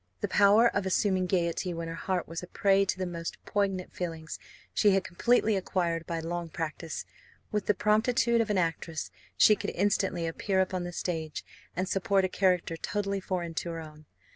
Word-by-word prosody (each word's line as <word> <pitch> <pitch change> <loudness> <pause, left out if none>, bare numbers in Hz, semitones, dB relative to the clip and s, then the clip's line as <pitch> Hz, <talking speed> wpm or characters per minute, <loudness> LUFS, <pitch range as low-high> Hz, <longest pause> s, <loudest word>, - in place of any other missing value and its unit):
The - - 0
power 210 +3 +6
of 200 -4 -1
assuming 190 -1 +2
gaiety 175 0 0
when 165 0 -4
her 165 - -4
heart 180 +1 -2
was 165 +1 -5
a 180 - -8
prey 195 +1 +3
to 185 - -1
the 185 - -2
most 170 -2 -5
poignant 195 -3 -1
feelings, 165 -3 -5 0.3
she 210 - +4
had 195 - +2
completely 220 +4 +2
acquired 175 -3 -1
by 170 -1 -2
long 170 +1 -4
practice. 160 0 -4 0.5
With 210 -2 -1
the 210 - +3
promptitude 230 +2 +3
of 225 - -2
an 205 - +1
actress, 165 -2 -2 0.3
she 215 - +7
could - - -4
instantly 195 -2 0
appear 190 +4 -1
upon 185 -1 0
the 175 - -5
stage, 160 -3 -4 0.3
and 185 +3 -1
support 195 0 +2
a - - -1
character 180 -3 +1
totally 200 +2 -2
foreign 180 -3 -3
to 170 - -3
her 165 -1 -4
own. 155 -1 -11
185 Hz, 190 wpm, -29 LUFS, 170-200 Hz, 0.5 s, she